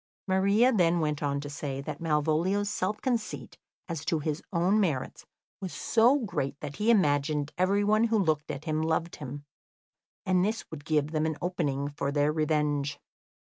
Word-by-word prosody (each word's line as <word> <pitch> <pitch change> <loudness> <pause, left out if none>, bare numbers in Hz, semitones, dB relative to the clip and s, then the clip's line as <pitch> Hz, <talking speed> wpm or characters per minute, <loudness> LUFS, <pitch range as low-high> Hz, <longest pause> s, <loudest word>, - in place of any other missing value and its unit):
] - - -82
Maria 200 +7 +4
then 175 -4 +3
went 150 -2 -1
on 140 -1 0
to 145 - -6
say 145 -2 -4
that 145 +2 -6
Malvolio's 165 +6 +1
self 210 +3 -1
conceit 235 -4 -3 0.3
as 165 -4 -4
to 170 -2 +1
his 155 +1 -2
own 185 +4 +2
merits 160 -11 -2 0.3
was 185 -2 -4
so 240 +5 +3
great 145 - -3
that 145 -1 -7
he 215 +2 +1
imagined 150 -7 +2
everyone 205 +4 +3
who 225 -1 +2
looked 155 -7 0
at 140 +3 -5
him 155 -1 0
loved 160 +1 -1
him, 145 0 -7 0.8
and 185 -1 +3
this 215 +3 -1
would 145 -3 -8
give 155 -2 +1
them 155 0 0
an 160 -2 -2
opening 150 -5 -1
for 145 -1 -3
their 145 +1 +2
revenge. 150 -2 0
160 Hz, 175 wpm, -28 LUFS, 145-190 Hz, 0.8 s, Maria